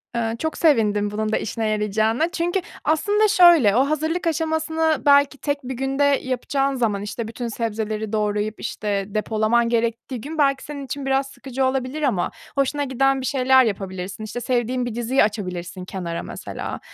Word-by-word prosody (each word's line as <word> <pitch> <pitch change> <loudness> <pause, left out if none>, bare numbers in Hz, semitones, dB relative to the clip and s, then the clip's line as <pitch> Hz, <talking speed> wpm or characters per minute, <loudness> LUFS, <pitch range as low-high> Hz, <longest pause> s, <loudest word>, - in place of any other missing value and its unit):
Iıı, 225 -1 -1
çok 315 +4 -3
sevindim 210 -9 +2
bunun 215 +1 -2
da - - +2
işine 225 0 -2
yarayacağına 215 - +1
çünkü 350 +1 -1 0.2
aslında 410 +8 +2
şöyle, 345 - +6
o 265 +3 +3
hazırlık 315 +4 -1
aşamasını 320 0 0
belki 280 0 +5
tek 285 0 -2
1 260 +1 -4
günde 270 +3 -1
yapacağın 275 0 0
zaman, 220 -6 0
işte, 215 +2 -5
bütün 235 +2 -5
sebzeleri 220 -1 -3
doğrayıp, 210 0 -1
işte, 200 -2 -2
depolaman 220 +3 +1
gerektiği 235 +1 -1
gün 310 +6 -7
belki 275 -2 +2
senin 285 -2 -7
için 275 +1 -5
biraz 270 0 +1
sıkıcı 265 -1 -3
olabilir 260 +3 -1
ama 245 -12 0 0.2
hoşuna 280 +1 +1
giden 270 0 +1
bir - - -4
şeyler 260 -1 +4
yapabilirsin. 195 -1 -4
İşte, 225 +3 -5
sevdiğin 245 +1 0
bir 235 - -4
diziyi 240 +3 +2
açabilirsin 185 -3 -4
kenara 175 -3 -4
mesela, - - -6
250 Hz, 165 wpm, -22 LUFS, 215-285 Hz, 0.2 s, şöyle